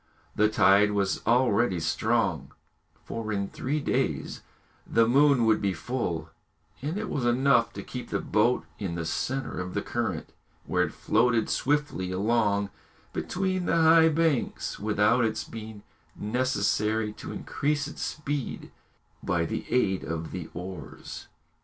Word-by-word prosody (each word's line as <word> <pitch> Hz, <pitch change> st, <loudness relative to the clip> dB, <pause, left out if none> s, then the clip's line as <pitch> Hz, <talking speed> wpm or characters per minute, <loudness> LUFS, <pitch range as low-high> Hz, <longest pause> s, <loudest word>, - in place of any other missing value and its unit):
The 105 Hz, 0 st, +4 dB
tide 105 Hz, 0 st, +5 dB
was 100 Hz, -2 st, 0 dB
already 120 Hz, -5 st, +3 dB
strong, -, -, 0 dB, 0.5 s
for 110 Hz, -1 st, -4 dB
in 100 Hz, -1 st, -1 dB
three 145 Hz, +4 st, -2 dB
days -, -, -1 dB, 0.5 s
the 115 Hz, 0 st, +3 dB
moon 140 Hz, -1 st, +5 dB
would 110 Hz, -1 st, +3 dB
be 100 Hz, -2 st, +1 dB
full, 90 Hz, -4 st, -3 dB, 0.5 s
and 150 Hz, +7 st, -2 dB
it 215 Hz, 0 st, -3 dB
was 135 Hz, -, -2 dB
enough 120 Hz, 0 st, +3 dB
to -, -, -6 dB
keep 125 Hz, -2 st, -7 dB
the -, -, -1 dB
boat 115 Hz, +4 st, +1 dB
in 95 Hz, -5 st, -3 dB
the 85 Hz, -1 st, -3 dB
centre 130 Hz, +12 st, -2 dB
of 90 Hz, 0 st, -5 dB
the -, -, -1 dB
current, -, -, -3 dB, 0.3 s
where -, -, +2 dB
it -, -, -6 dB
floated 115 Hz, 0 st, +2 dB
swiftly 145 Hz, -10 st, 0 dB
along 100 Hz, 0 st, +1 dB, 0.4 s
between 185 Hz, -1 st, -1 dB
the -, -, +2 dB
high 160 Hz, 0 st, +6 dB
banks 160 Hz, -4 st, 0 dB
without 105 Hz, +3 st, +3 dB
its 110 Hz, -1 st, 0 dB
being 110 Hz, -2 st, -9 dB, 0.3 s
necessary 110 Hz, -2 st, 0 dB
to -, -, -8 dB
increase 145 Hz, 0 st, -1 dB
its 150 Hz, -, -8 dB
speed 145 Hz, -3 st, -4 dB, 0.5 s
by 85 Hz, -2 st, 0 dB
the -, -, -4 dB
aid 95 Hz, -7 st, +2 dB
of 80 Hz, 0 st, -4 dB
the 90 Hz, -4 st, -6 dB
oars. 90 Hz, +2 st, -8 dB
115 Hz, 140 wpm, -27 LUFS, 100-135 Hz, 0.5 s, high